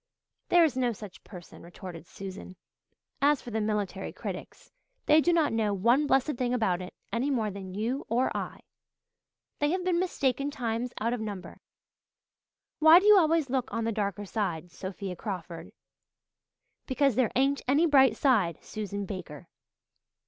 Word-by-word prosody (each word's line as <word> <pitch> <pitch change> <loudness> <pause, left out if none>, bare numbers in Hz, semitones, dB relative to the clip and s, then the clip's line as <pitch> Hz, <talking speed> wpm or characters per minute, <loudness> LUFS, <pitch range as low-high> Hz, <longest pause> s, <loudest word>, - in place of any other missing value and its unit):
"There 350 -1 +6
is 305 -6 +2
no 250 -2 +1
such 205 -2 -11
person," 180 -5 -12
retorted 170 -1 -10
Susan. 190 -1 -9 0.7
"As 285 0 +4
for 240 - -9
the 220 0 -1
military 210 -2 -2
critics, - - -8 0.3
they 305 +1 +6
do 350 - +2
not 325 -7 +2
know 215 -3 +1
one 240 +9 +3
blessed 270 0 +2
thing 250 0 0
about 190 -7 0
it, 180 - -9 0.2
any 250 +5 0
more 225 -6 0
than 190 -1 -8
you 235 +7 -2
or 240 +3 +1
I. - - -5 1.0
They 290 - +2
have 365 +2 -1
been 355 -2 +2
mistaken 280 -6 0
times 240 -2 -3
out 230 +2 0
of 245 - -3
number. 205 -4 -7 1.2
Why 315 +2 +9
do 385 - -3
you 420 0 +8
always 320 -5 +2
look 260 -1 -1
on 230 - -2
the 230 - 0
dark 200 -4 -2
side, 180 -5 -3
Sophia 190 +1 -6
Crawford?" 175 -3 -6 1.2
"Because 275 0 +2
there 240 0 +1
ain't 275 +2 +2
any 285 +6 +4
bright 265 -7 +5
side, 200 - +2
Susan 205 -2 -5
Baker." 180 -7 -8
230 Hz, 160 wpm, -28 LUFS, 195-275 Hz, 1.2 s, Why